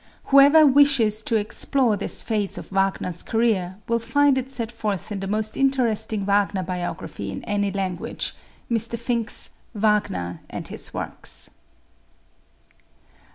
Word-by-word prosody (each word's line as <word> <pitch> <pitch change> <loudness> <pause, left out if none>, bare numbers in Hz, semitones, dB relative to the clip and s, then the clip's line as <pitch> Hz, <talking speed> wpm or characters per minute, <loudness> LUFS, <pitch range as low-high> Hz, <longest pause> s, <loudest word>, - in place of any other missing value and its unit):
Whoever 285 +3 +8
wishes 270 -6 +4
to 225 - -1
explore 225 +2 +1
this 200 - 0
phase 210 -4 -1
of - - -9
Wagner's 195 -2 0
career 205 -6 0
will 235 0 +1
find 280 +5 +3
it 260 0 -2
set 235 -4 -3
forth 215 -3 -3
in 200 - -3
the 195 - -4
most 215 +2 -1
interesting 235 -6 +1
Wagner 200 -1 +1
biography 175 - -5
in 95 - -6
any 205 -1 -1
language, 190 -3 -3 0.3
Mr. 230 0 0
Finck's 235 -1 -2 0.2
"Wagner 205 - 0
and - - -6
His - - -4
Works." - - -3
215 Hz, 130 wpm, -23 LUFS, 195-235 Hz, 0.3 s, Whoever